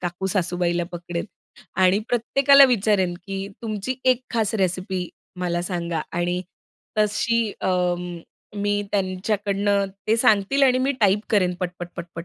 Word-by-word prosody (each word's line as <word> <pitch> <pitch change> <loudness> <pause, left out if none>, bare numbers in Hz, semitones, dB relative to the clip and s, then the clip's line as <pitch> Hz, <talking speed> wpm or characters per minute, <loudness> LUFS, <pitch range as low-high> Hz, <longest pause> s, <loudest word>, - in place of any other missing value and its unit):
काकू-सासूबाईला 175 -1 -1
पकडेन 175 0 -4 0.6
आणि 185 +2 +5
प्रत्येकाला 275 +4 +5
विचारेन 205 -7 +2
की 195 0 -4 0.2
तुमची 220 +2 -3 0.2
1 250 0 -7
खास 225 -2 0
रेसिपी 185 -1 -1 0.3
मला 175 -1 -1
सांगा 170 -2 -2
आणि 175 +1 -1 0.6
तशी 215 +1 +1
अं, 180 -1 -1 0.4
मी 205 0 0
त्यांच्याकडनं 200 +1 0 0.2
ते 220 +1 +3
सांगतील 230 +3 +3
आणि 255 -2 +5
मी 265 +2 +1
टाईप 205 -1 +4
करेन 185 -4 +2
पट-पट-पट-पट 175 -1 -6
195 Hz, 120 wpm, -23 LUFS, 175-215 Hz, 0.6 s, आणि